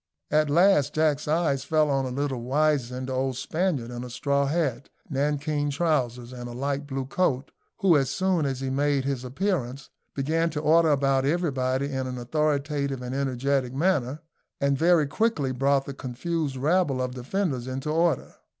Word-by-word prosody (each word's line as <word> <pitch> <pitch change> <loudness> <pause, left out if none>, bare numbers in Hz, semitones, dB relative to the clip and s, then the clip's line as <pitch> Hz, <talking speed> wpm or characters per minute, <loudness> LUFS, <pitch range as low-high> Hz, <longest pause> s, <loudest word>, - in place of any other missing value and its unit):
At 155 -1 +3
last 150 -3 +4
Jack's 155 -3 +1
eyes 155 -4 +1
fell 155 0 +2
on 135 -1 +1
a - - -3
little 135 -1 -2
wizened 130 -1 0
old 130 -1 -1
Spaniard 155 -7 -1
in 120 0 -5
a 125 - -7
straw 140 +3 0
hat, 140 -5 -1 0.2
nankeen 145 +1 0
trousers, 130 -6 -1
and 120 -1 -7
a - - -7
light 140 +3 -2
blue 135 -1 -3
coat, 135 -2 0 0.3
who, 190 -4 +5
as 135 -3 +2
soon 185 -5 +1
as 135 -1 -3
he 135 -1 -2
made 140 0 +1
his 135 -3 -2
appearance, 135 -2 -2 0.2
began 160 +4 +1
to 150 - -3
order 160 +2 +4
about 135 -2 +2
everybody 135 -4 0
in 130 -1 -2
an 125 0 -5
authoritative 140 0 -1
and 125 +1 -4
energetic 135 -1 -1
manner, 145 -3 0 0.4
and 140 0 +2
very 165 +1 +4
quickly 145 - 0
brought 135 +1 +1
the 140 - -6
confused 140 +3 -3
rabble 150 0 +1
of 125 0 -2
defenders 130 0 -2
into 135 +3 -3
order. 165 -3 0
140 Hz, 170 wpm, -26 LUFS, 130-155 Hz, 0.4 s, who